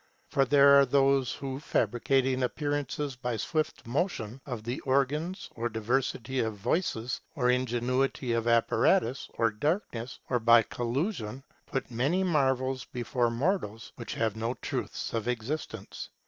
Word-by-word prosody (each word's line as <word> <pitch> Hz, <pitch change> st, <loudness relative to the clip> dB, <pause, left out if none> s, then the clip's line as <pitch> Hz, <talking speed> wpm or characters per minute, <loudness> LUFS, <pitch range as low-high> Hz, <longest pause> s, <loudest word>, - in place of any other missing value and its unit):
For 135 Hz, -2 st, +3 dB
there 140 Hz, +1 st, +7 dB
are 140 Hz, -, +6 dB
those 135 Hz, -1 st, +3 dB
who, 135 Hz, -1 st, -5 dB
fabricating 130 Hz, +1 st, +1 dB
appearances 145 Hz, +1 st, -2 dB
by 125 Hz, -2 st, -3 dB
swift 155 Hz, +8 st, -2 dB
motion 130 Hz, -, -2 dB
of 120 Hz, -5 st, -5 dB
the 120 Hz, +3 st, -3 dB
organs, 145 Hz, +7 st, 0 dB
or 120 Hz, -1 st, -2 dB
diversity 120 Hz, +3 st, -1 dB
of 110 Hz, -2 st, 0 dB
voices, 120 Hz, -, -1 dB
or 125 Hz, -4 st, +3 dB
ingenuity 125 Hz, +1 st, 0 dB
of 115 Hz, 0 st, 0 dB
apparatus, 115 Hz, +1 st, +2 dB
or 115 Hz, -1 st, +2 dB
darkness, 130 Hz, -, -2 dB
or 125 Hz, -, +1 dB
by 115 Hz, 0 st, +6 dB
collusion, 125 Hz, -, -3 dB, 0.2 s
put 135 Hz, -, -3 dB
many 140 Hz, +11 st, +1 dB
marvels 130 Hz, -6 st, +1 dB
before 120 Hz, 0 st, -1 dB
mortals 115 Hz, -, -1 dB
which 120 Hz, -, -6 dB
have 110 Hz, -2 st, 0 dB
no 115 Hz, +3 st, -2 dB
truth -, -, -4 dB
of 115 Hz, 0 st, -2 dB
existence. 120 Hz, -3 st, -4 dB
125 Hz, 135 wpm, -29 LUFS, 115-140 Hz, 0.2 s, there